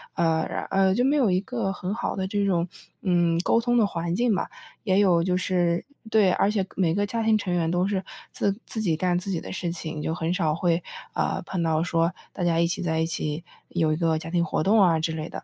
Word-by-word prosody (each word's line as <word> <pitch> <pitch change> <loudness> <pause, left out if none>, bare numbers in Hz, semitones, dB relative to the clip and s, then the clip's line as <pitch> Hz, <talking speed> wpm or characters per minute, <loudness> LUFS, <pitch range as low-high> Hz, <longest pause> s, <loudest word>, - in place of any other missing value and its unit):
呃， 165 -1 +2 0.3
呃， 195 -1 +3
就 245 +5 +2
没 280 +2 +3
有 255 -9 +3
一 180 - +3
个 215 -2 -2
很 185 0 -4
好 235 - -2
的 190 - -1
这 205 +1 0
种， 180 -3 +1 0.3
嗯， 175 -3 +2
沟 230 - +3
通 240 +1 +1
的 220 -3 +4
环 170 -2 -3
境 235 -1 +2
吧。 - - -2 0.3
也 190 -4 +2
有 175 -4 +4
就 180 0 +1
是 175 -2 0 0.2
对， 210 -4 +4
而 200 - +2
且 205 -3 0
每 170 -3 +1
个 205 +1 +1
家 230 +3 -2
庭 220 -1 +4
成 190 -4 -2
员 165 -2 +1
都 175 +2 +1
是 195 -2 -1 0.3
自 200 +1 -1
自 220 - -4
己 170 -7 +1
干 175 +1 +1
自 185 - -7
己 180 -4 -1
的 - - -8
事 175 -2 -3
情， 160 -2 -5
就 160 - -2
很 165 0 -1
少 160 -5 +1
会， 170 0 +1 0.3
啊， - - -1
碰 185 - -3
到 160 -1 +1
说 165 0 +1 0.2
大 180 - -4
家 170 -1 +2
一 170 - +4
起 170 +2 -2
在 160 -2 0
一 160 - +2
起 160 -1 -3 0.3
有 160 -3 +1
一 - - 0
个 165 -1 +1
家 165 +1 -7
庭 175 -1 +2
活 155 -1 -1
动 210 +2 +4
啊 170 -4 +4
之 160 +1 -1
类 160 0 -4
的。 - - -7
180 Hz, 270 characters per minute, -25 LUFS, 165-195 Hz, 0.3 s, 的